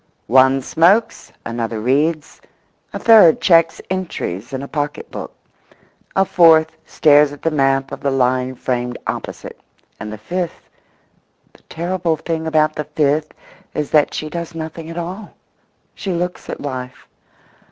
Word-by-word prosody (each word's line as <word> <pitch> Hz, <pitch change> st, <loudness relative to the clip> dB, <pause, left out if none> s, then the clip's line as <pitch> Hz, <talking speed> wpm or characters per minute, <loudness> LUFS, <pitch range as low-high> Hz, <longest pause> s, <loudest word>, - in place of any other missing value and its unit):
One 130 Hz, +1 st, +4 dB
smokes; 190 Hz, -, +2 dB
another 115 Hz, -1 st, -3 dB
reads; 145 Hz, +7 st, 0 dB, 0.5 s
a -, -, -4 dB
third 215 Hz, -8 st, +6 dB
checks 165 Hz, -2 st, +3 dB
entries 165 Hz, -, -4 dB
in 135 Hz, 0 st, -4 dB
a -, -, -6 dB
pocket 145 Hz, -1 st, -4 dB
book; -, -, -7 dB, 0.8 s
a 195 Hz, -, +3 dB
fourth 160 Hz, -3 st, +4 dB
stares 150 Hz, -1 st, +4 dB
at 145 Hz, -, -12 dB
the 165 Hz, -, +1 dB
map 135 Hz, -2 st, +1 dB
of -, -, -6 dB
the 140 Hz, -, -1 dB
line 130 Hz, -1 st, 0 dB
framed 125 Hz, -1 st, -3 dB
opposite; -, -, -6 dB, 0.4 s
and 105 Hz, 0 st, -6 dB
the 110 Hz, -, -7 dB
fifth—the 175 Hz, -, -9 dB
terrible 170 Hz, -1 st, -1 dB
thing 160 Hz, 0 st, -3 dB
about 155 Hz, -1 st, +2 dB
the 150 Hz, -, -4 dB
fifth 150 Hz, 0 st, 0 dB, 0.4 s
is 150 Hz, -1 st, -3 dB
that 150 Hz, -2 st, +3 dB
she 155 Hz, -, -4 dB
does 170 Hz, +1 st, -6 dB
nothing 160 Hz, 0 st, -7 dB
at 165 Hz, -, -8 dB
all. 185 Hz, +5 st, -6 dB, 0.6 s
She 195 Hz, -, -5 dB
looks 180 Hz, +1 st, -4 dB
at -, -, -5 dB
life. 130 Hz, -3 st, -7 dB
155 Hz, 140 wpm, -18 LUFS, 135-170 Hz, 0.8 s, third